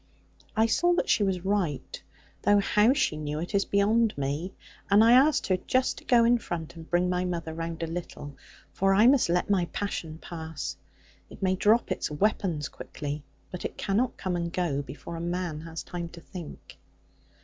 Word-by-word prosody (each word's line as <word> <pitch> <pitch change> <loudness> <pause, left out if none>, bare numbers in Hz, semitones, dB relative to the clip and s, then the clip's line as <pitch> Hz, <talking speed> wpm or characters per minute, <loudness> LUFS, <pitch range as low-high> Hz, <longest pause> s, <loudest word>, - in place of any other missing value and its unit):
I 220 - +5
saw 350 +10 +3
that - - 0
she - - +3
was 190 -2 0
right; 190 -8 -1 0.4
though 205 - +4
how 210 +3 +4
she 260 - 0
knew 150 0 -3
it 170 +6 -5
is 200 0 +2
beyond 215 +1 +2
me; 145 +7 -3 0.3
and 205 +2 +6
I 230 - +6
asked 275 +5 +5
her 185 -1 +2
just 255 +7 0
to - - -20
go 240 -2 +5
in 240 +1 +4
front, 170 -5 -5
and 165 -1 -11
bring 175 +1 +2
my 180 0 0
mother 170 -3 -3
round 165 0 -4
a - - +1
little. 165 -4 -6 0.4
For 195 0 +2
I 210 +3 +6
must 260 -6 +5
let 180 +3 +1
my 185 -3 +3
passion 170 -4 -4
pass: 160 - -6 0.5
it - - -10
may 185 0 +2
drop 210 +3 +3
its 185 - -1
weapons 160 -2 0
quickly; 145 0 -6 0.3
but 180 - -6
it - - -5
cannot 215 +5 0
come 185 -2 -2
and 170 -1 -2
go, 170 -6 -1
before 145 +5 -8
a - - -5
man 175 -2 -3
has 165 0 -7
time 170 -2 -5
to 170 - -9
think. 170 -1 -10
180 Hz, 195 wpm, -27 LUFS, 160-205 Hz, 0.5 s, and